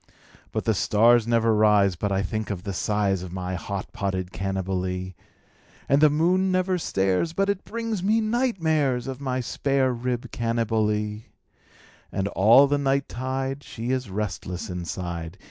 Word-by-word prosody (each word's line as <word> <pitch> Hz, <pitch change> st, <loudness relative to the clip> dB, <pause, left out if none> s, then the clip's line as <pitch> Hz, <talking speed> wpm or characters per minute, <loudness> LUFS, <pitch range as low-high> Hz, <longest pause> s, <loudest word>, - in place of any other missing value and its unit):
But -, -, -3 dB
the -, -, +3 dB
stars 115 Hz, +2 st, +4 dB
never 115 Hz, -1 st, +3 dB
rise 105 Hz, -3 st, +4 dB
but 100 Hz, +4 st, -2 dB
I 95 Hz, 0 st, +1 dB
think 110 Hz, +3 st, -3 dB
of 95 Hz, -4 st, -4 dB
the 100 Hz, -, -4 dB
size 100 Hz, -1 st, 0 dB
Of 90 Hz, -1 st, -7 dB
my 90 Hz, 0 st, -4 dB
hot 100 Hz, +2 st, -5 dB
potted 95 Hz, -2 st, -2 dB
Cannibalee, 95 Hz, -1 st, -3 dB, 0.7 s
And 140 Hz, +2 st, +3 dB
the 155 Hz, -, +7 dB
moon 180 Hz, +5 st, +2 dB
never 185 Hz, 0 st, +1 dB
stares 95 Hz, -, 0 dB
but 195 Hz, +3 st, +1 dB
it 200 Hz, -1 st, -6 dB
brings 230 Hz, -3 st, -3 dB
me 215 Hz, +4 st, +2 dB
night 235 Hz, 0 st, 0 dB
mares 145 Hz, -6 st, +1 dB
Of 135 Hz, 0 st, -6 dB
my 130 Hz, -2 st, -1 dB
spare 135 Hz, +1 st, 0 dB
rib 120 Hz, 0 st, -3 dB
Cannibalee; 110 Hz, -2 st, -1 dB, 0.9 s
And 95 Hz, 0 st, -1 dB
all 115 Hz, +9 st, +6 dB
the 145 Hz, +1 st, +1 dB
night 140 Hz, 0 st, +1 dB
tide 135 Hz, +2 st, -3 dB
she 115 Hz, +2 st, -5 dB
is 130 Hz, -4 st, -2 dB
restless 95 Hz, -1 st, -4 dB
inside. 85 Hz, 0 st, -5 dB
115 Hz, 160 wpm, -25 LUFS, 95-140 Hz, 0.9 s, the